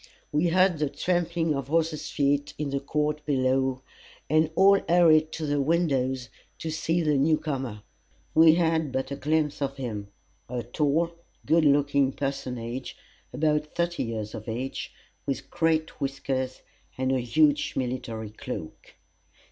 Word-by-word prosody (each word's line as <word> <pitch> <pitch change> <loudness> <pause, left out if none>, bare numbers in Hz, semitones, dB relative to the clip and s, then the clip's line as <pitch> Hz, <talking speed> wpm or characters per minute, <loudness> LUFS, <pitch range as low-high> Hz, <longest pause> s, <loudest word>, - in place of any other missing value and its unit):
We 150 +4 +2
heard 180 -1 +3
the 150 -2 +1
trampling 170 +1 0
of 140 -2 -3
horses' 155 0 0
feet 145 0 0
in 145 -2 -3
the 140 - 0
court 150 +2 -1
below, 130 -2 +1 0.5
and 155 0 +4
all 195 +2 +6
hurried 160 -3 +5
to 160 - -3
the 145 -1 +1
windows, 135 -5 0 0.3
to 160 - -4
see 165 +2 0
the 150 -1 +2
new 155 +3 +3
comer. 130 -9 -4 0.5
We 160 0 +7
had 160 -3 +1
but 130 +1 -2
a - - -2
glimpse 150 +1 0
of 135 0 -2
him 110 -6 -4 0.4
a 125 -1 -3
tall, 150 +7 +1 0.3
good 165 -1 +4
looking 140 -1 +3
personage, 130 -3 -4 0.4
about 150 +2 0
thirty 170 0 0
years 110 -2 -4
of 110 +1 -7
age, 125 +4 -4 0.4
with 135 -3 -3
great 160 -1 0
whiskers, 135 -1 -2 0.3
and 130 0 0
a 130 - +2
huge 145 +5 +2
military 120 -4 -3
cloak. 110 -7 -8
145 Hz, 145 wpm, -27 LUFS, 130-160 Hz, 0.5 s, We